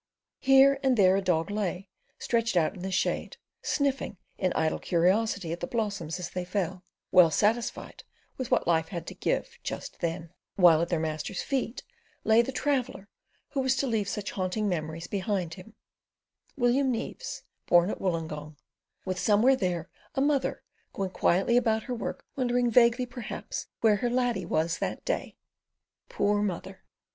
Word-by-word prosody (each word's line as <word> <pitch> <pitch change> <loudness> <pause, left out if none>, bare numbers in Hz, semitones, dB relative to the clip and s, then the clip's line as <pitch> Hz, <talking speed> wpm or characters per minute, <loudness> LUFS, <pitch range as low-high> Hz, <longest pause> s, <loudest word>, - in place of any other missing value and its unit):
Here 270 0 +6
and 265 -3 +2
there 190 -2 +5
a 195 - +1
dog 180 0 0
lay, 195 -2 -2 0.3
stretched 230 -4 0
out 160 -2 +2
in 185 - -10
the 190 - -3
shade, 185 - -1 0.2
sniffing 275 -7 -1 0.2
in 185 -1 0
idle 160 0 0
curiosity 185 +1 +1
at 170 - -3
the - - -3
blossoms 205 - -2
as 180 - -5
they 180 - -3
fell, 180 -1 -3 0.3
well 180 -3 +7
satisfied 220 +8 0 0.3
with 260 -3 -4
what - - +2
life 160 -1 +2
had 170 -2 -6
to - - -7
give - - -2
just - - -6
then; 165 0 -3 0.2
while 170 -4 +6
at 170 - -1
their 170 - +1
master's 155 -1 -3
feet 260 -3 -2 0.4
lay 220 +1 +5
the 235 - -3
traveller 255 -7 -1 0.4
who 280 - -3
was 260 0 +2
to 275 - 0
leave 220 -5 0
such 210 -1 -3
haunting 190 +3 -1
memories 165 -2 -3
behind 190 -4 -2
him: 190 +5 -12 0.8
William 260 +2 +3
Neaves, 250 - -5 0.2
born 175 +3 +5
at - - -6
Woolongong, 155 -4 -3 0.5
with 185 -1 -2
somewhere 225 +7 +4
there 180 -8 -2 0.3
a - - 0
mother 280 -1 +1 0.3
going 195 -2 -3
quietly 195 +7 +2
about 220 -2 +2
her 255 - -4
work, 235 - -5
wondering 245 -2 +1
vaguely 235 +2 +5
perhaps 245 -2 -6
where 215 -2 +4
her 240 +4 0
laddie 240 -7 0
was 165 +1 0
that - - -3
day. - - -2 0.7
Poor 205 0 +1
mother! 190 -1 -4
200 Hz, 165 wpm, -28 LUFS, 175-240 Hz, 0.8 s, well